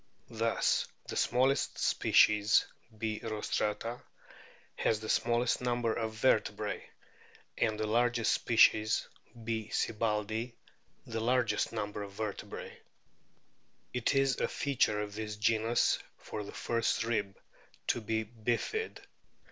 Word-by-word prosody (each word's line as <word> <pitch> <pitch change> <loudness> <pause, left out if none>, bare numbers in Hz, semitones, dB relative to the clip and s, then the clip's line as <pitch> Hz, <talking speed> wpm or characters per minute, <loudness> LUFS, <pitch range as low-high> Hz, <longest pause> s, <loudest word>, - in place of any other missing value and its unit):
Thus 115 0 +1 0.2
the - - -4
smallest 130 +3 +2
species 105 +2 +4 0.3
B. 110 -1 -2
rostrata 110 +1 -2 0.7
has 110 - +1
the 110 0 -7
smallest 120 +1 +2
number 120 -2 0
of 110 -1 -2
vertebrae, 125 +4 +1 0.7
and 110 -2 0
the 110 - 0
largest 120 +1 +2
species 110 -2 +4 0.4
B. 110 -1 -3
sibbaldii 110 +2 -1 0.5
the 115 -1 -4
largest 120 -2 +1
number 105 -2 -3
of 100 -1 -7
vertebrae. 105 -1 -6 1.1
It 125 +3 0
is 135 -1 +2
a - - +1
feature 130 -7 +1
of 105 -1 -5
this 105 0 -4
genus 115 +2 +2 0.2
for 105 - -6
the 100 - -8
first 115 -1 0
rib 105 -4 -1 0.5
to 120 - 0
be 110 +1 -1
bifid. 120 - -2
110 Hz, 115 wpm, -32 LUFS, 105-120 Hz, 1.1 s, species